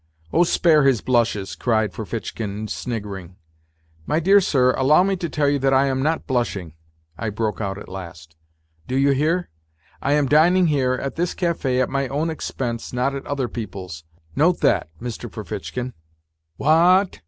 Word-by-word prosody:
" 80 0 -29
Oh, 175 - +5
spare 165 -2 +4
his 135 -4 +3
blushes," 115 -6 0
cried 110 -4 0
Ferfitchkin, 110 -1 -5
sniggering. 100 -7 -5 0.4
" 80 0 -35
My 155 - +1
dear 195 +4 +5
sir, 130 -7 +3
allow 145 +7 +4
me 195 0 +1
to 170 -2 -3
tell 150 -2 0
you 140 0 +2
I 135 +1 +4
am 130 -1 0
not 160 +3 0
blushing," 110 - -2 0.5
I 110 - -2
broke 110 +1 -2
out 100 -2 -3
at 105 - -10
last; 85 -3 -9 0.5
"do 130 - -2
you 140 +1 +3
hear? 155 - 0 0.5
I 140 - +1
am 150 -1 +3
dining 170 +6 +4
here, 135 -5 +2
at 135 +3 -4
this 175 +1 -1
cafe, 155 -8 0
at 130 - +2
my 135 0 -1
own 150 +5 -1
expense, 120 -6 -4
not 125 +3 0
at 140 - -6
other 140 -3 -1
people's 95 -8 -7 0.3
note 170 +4 +2
that, - - +2
Mr. 120 -1 -6
Ferfitchkin." 110 +4 -5 0.3
" 80 0 -51
Wha 170 +6 +5
at 195 - -8
130 Hz, 175 wpm, -22 LUFS, 105-150 Hz, 0.5 s, Oh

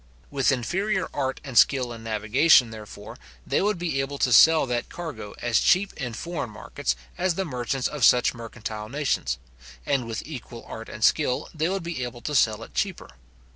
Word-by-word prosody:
With 140 -1 +2
inferior 190 - -1
art 130 -2 -2
and 135 -4 -8
skill 125 -1 +4
in 115 -1 -10
navigation, 115 +4 +4
therefore, 110 -1 -10 0.3
they - - +1
would 205 0 +1
be 165 -6 -1
able 140 +1 -4
to 125 -3 +2
sell 160 +5 +7
that 120 -2 -2
cargo 150 -12 -7
as 120 -3 +3
cheap 195 +2 +3
in 125 -5 -5
foreign 155 0 -4
markets 65 - -3 0.2
as 180 -1 +1
the 190 - -1
merchants 125 -2 -2
of 150 -4 -5
such 125 +1 +5
mercantile 110 -2 -7
nations; 130 - -1 0.5
and 130 -4 0
with 115 - -4
equal 125 -5 -9
art 115 +1 -8
and 110 - -6
skill 130 +1 +2
they 160 +1 0
would 195 -1 -2
be 165 -6 -4
able 120 -1 -6
to 150 - -4
sell 110 -6 +2
it - - -13
cheaper. - - -3
130 Hz, 185 wpm, -25 LUFS, 115-160 Hz, 0.5 s, sell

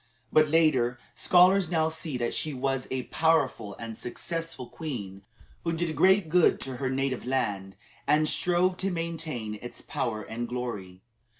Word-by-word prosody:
But 155 0 +6
later 145 -6 +3 0.2
scholars 185 0 +4
now 160 -2 +2
see 160 -4 -4
that 120 -1 -1
she 155 -3 -1
was 135 0 -1
a 130 -1 -2
powerful 155 -11 +1
and 115 -1 -6
successful 165 +3 -4
queen, 110 - -6 0.4
who 165 - -1
did 165 -1 -2
great 190 +4 +4
good 175 +1 +4
to 130 -2 -4
her 130 0 -1
native 130 -1 -1
land, 100 -7 -1 0.3
and 150 +2 +4
strove 180 +2 +2
to 195 - -1
maintain 160 - -4
its 120 - -9
power 110 -3 -3
and 120 +3 -5
glory. 105 -7 -5
135 Hz, 155 wpm, -28 LUFS, 120-165 Hz, 0.4 s, But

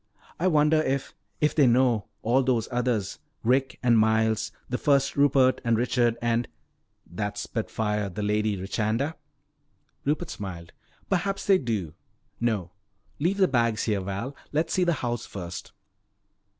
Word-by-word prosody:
I 180 - +2
wonder 155 -2 +4
if 135 -2 -2 0.3
if 150 - +3
they 145 -4 +5
know. 120 -4 +3 0.2
All 125 +4 +3
those 125 -4 +1
others. 120 -5 -1 0.2
Rick 130 +2 +1
and 120 -2 +5
Miles, 110 0 +2 0.2
the 125 - -2
first 140 -1 +2
Rupert 135 -2 +4
and 115 -1 +2
Richard 120 -1 +1
and 120 0 +1 0.3
" - - -48
"That 105 -1 -2
spitfire, 105 -2 -2
the 105 +3 -5
Lady 105 0 +1
Richanda?" 110 +9 -1 0.9
Rupert 155 +4 -1
smiled. 90 -5 -7 0.4
"Perhaps 195 +1 -1
they 195 -2 +5
do. 105 - -3 0.5
No, 105 -7 -1 0.5
leave 175 +7 +1
the 190 -2 +5
bags 115 -5 +1
here, 105 -3 0
Val. 100 +9 -4 0.2
Let's 160 +2 0
see 185 - +2
the 170 - +3
house 120 -1 -2
first." 90 -3 -7
120 Hz, 145 wpm, -26 LUFS, 105-140 Hz, 0.9 s, they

